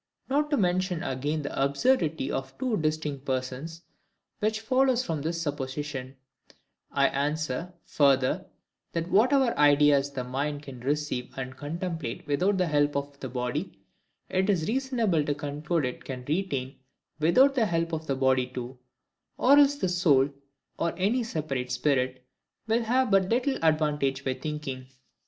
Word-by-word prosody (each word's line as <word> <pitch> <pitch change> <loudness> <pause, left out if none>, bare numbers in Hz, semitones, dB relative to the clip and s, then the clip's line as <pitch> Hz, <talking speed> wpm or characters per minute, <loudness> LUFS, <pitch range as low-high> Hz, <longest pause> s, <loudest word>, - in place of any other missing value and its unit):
Not 295 +2 +1
to 290 - +2
mention 180 -3 0
again 145 +4 -2
the 140 -1 -1
absurdity 160 - +1
of 135 0 -4
two 255 -3 0
distinct 155 -3 -2
persons, 135 +5 -4 0.6
which 215 0 0
follows 255 +1 +2
from 160 -3 -2
this 165 +3 -2
supposition, 140 -3 -4 0.8
I 140 0 +3
answer, 150 +3 -2
further,—That 155 +4 -1
whatever 255 +3 +4
ideas 145 -1 +5
the 135 -3 -4
mind 145 +3 -3
can 135 -4 -9
receive 140 -1 -2
and 130 0 -5
contemplate 160 -2 -4
without 180 +8 +1
the 180 - +2
help 145 -2 +1
of 140 0 -4
the 130 - -5
body, 125 +7 -3 0.5
it 190 +2 0
is 175 -5 +1
reasonable 230 - +1
to 145 0 -1
conclude 150 +2 -2
it 125 - -5
can 125 -2 -7
retain 145 -5 -2 0.4
without 255 - +5
the 235 -5 +2
help 165 -1 -1
of 160 0 -3
the 135 - 0
body 130 -1 +2
too; 125 0 -7 0.6
or 280 +3 +6
else 285 0 +5
the 285 - -1
soul, 160 -7 +3 0.5
or 170 - 0
any 210 +7 +1
separate 145 - -3
spirit, 130 -1 0 0.4
will 225 +1 +2
have 250 +1 +1
but 190 -1 +4
little 255 +4 +1
advantage 150 -4 +1
by 130 - +1
thinking. 135 -2 -5
150 Hz, 145 wpm, -27 LUFS, 135-190 Hz, 0.8 s, or